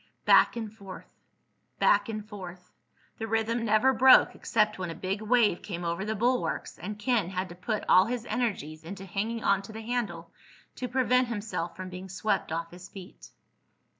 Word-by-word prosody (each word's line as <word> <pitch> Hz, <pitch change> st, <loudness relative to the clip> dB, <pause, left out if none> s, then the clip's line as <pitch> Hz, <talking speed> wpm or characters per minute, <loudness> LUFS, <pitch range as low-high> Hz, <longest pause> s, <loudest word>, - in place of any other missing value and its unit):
Back -, -, +6 dB
and 220 Hz, -3 st, -5 dB
forth... 195 Hz, -3 st, -11 dB, 0.6 s
back -, -, +3 dB
and 215 Hz, -1 st, -5 dB
forth.... 185 Hz, -4 st, -10 dB, 0.5 s
The 225 Hz, -, -3 dB
rhythm 225 Hz, +1 st, 0 dB
never 230 Hz, +4 st, +3 dB
broke 260 Hz, +2 st, +7 dB
except 215 Hz, -2 st, 0 dB
when 185 Hz, -2 st, -3 dB
a 165 Hz, -, -6 dB
big 190 Hz, +4 st, -3 dB
wave 220 Hz, -4 st, +3 dB
came 175 Hz, -3 st, -5 dB
over 170 Hz, +3 st, -2 dB
the 220 Hz, +1 st, -2 dB
bulwarks 245 Hz, +4 st, -1 dB
and 210 Hz, +3 st, -6 dB
Ken 210 Hz, -4 st, 0 dB
had 185 Hz, 0 st, -3 dB
to 175 Hz, -, -10 dB
put 210 Hz, +4 st, -3 dB
all 185 Hz, -, +6 dB
his 240 Hz, -1 st, -3 dB
energies 165 Hz, -, -3 dB
into 195 Hz, +3 st, -8 dB
hanging 215 Hz, +5 st, -3 dB
onto 200 Hz, +1 st, +1 dB
the 220 Hz, +1 st, -7 dB
handle 220 Hz, -8 st, -3 dB, 0.5 s
to 250 Hz, -, -3 dB
prevent 250 Hz, 0 st, +2 dB
himself 205 Hz, -6 st, -4 dB
from 185 Hz, 0 st, -7 dB
being 185 Hz, +1 st, -8 dB
swept 190 Hz, -1 st, -1 dB
off 165 Hz, +1 st, -3 dB
his 175 Hz, +1 st, -12 dB
feet. 190 Hz, -2 st, -12 dB
210 Hz, 175 wpm, -28 LUFS, 185-230 Hz, 0.6 s, broke